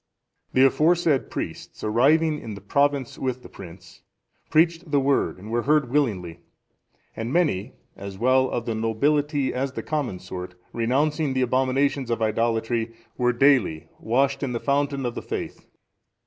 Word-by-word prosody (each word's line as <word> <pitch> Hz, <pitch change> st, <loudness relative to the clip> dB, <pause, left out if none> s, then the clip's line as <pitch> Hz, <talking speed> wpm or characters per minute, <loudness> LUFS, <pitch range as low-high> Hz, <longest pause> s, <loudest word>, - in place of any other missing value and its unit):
(408) 130 Hz, -, +4 dB
The -, -, +8 dB
aforesaid 155 Hz, -3 st, +2 dB
priests, -, -, -6 dB
arriving 150 Hz, +8 st, +3 dB
in 110 Hz, -2 st, -7 dB
the -, -, -9 dB
province 140 Hz, +5 st, 0 dB
with 130 Hz, -1 st, -3 dB
the -, -, -11 dB
prince, 85 Hz, +1 st, -13 dB, 0.5 s
preached 165 Hz, +1 st, +2 dB
the 145 Hz, -1 st, +3 dB
Word, 135 Hz, -6 st, +1 dB
and 105 Hz, +4 st, -10 dB
were 120 Hz, +1 st, +1 dB
heard 145 Hz, -2 st, +2 dB
willingly; 95 Hz, -, 0 dB, 0.8 s
and 115 Hz, +2 st, -4 dB
many, 135 Hz, -, +1 dB, 0.2 s
as 100 Hz, -1 st, -8 dB
well 130 Hz, +3 st, +3 dB
of 115 Hz, -, -3 dB
the 115 Hz, -, -1 dB
nobility 140 Hz, +6 st, 0 dB
as 130 Hz, +1 st, -2 dB
the -, -, -5 dB
common 145 Hz, -11 st, -2 dB
sort, 90 Hz, 0 st, -8 dB, 0.2 s
renouncing 140 Hz, +5 st, 0 dB
the 130 Hz, -, +2 dB
abominations 130 Hz, +1 st, +1 dB
of 115 Hz, -, 0 dB
idolatry, 115 Hz, +1 st, 0 dB, 0.2 s
were 125 Hz, -1 st, +2 dB
daily 120 Hz, -, +2 dB
washed 135 Hz, +4 st, +1 dB
in 135 Hz, -3 st, -2 dB
the 120 Hz, -, -2 dB
fountain 140 Hz, 0 st, 0 dB
of 120 Hz, -, -2 dB
the -, -, -5 dB
faith. -, -, -6 dB
130 Hz, 160 wpm, -24 LUFS, 115-145 Hz, 0.8 s, The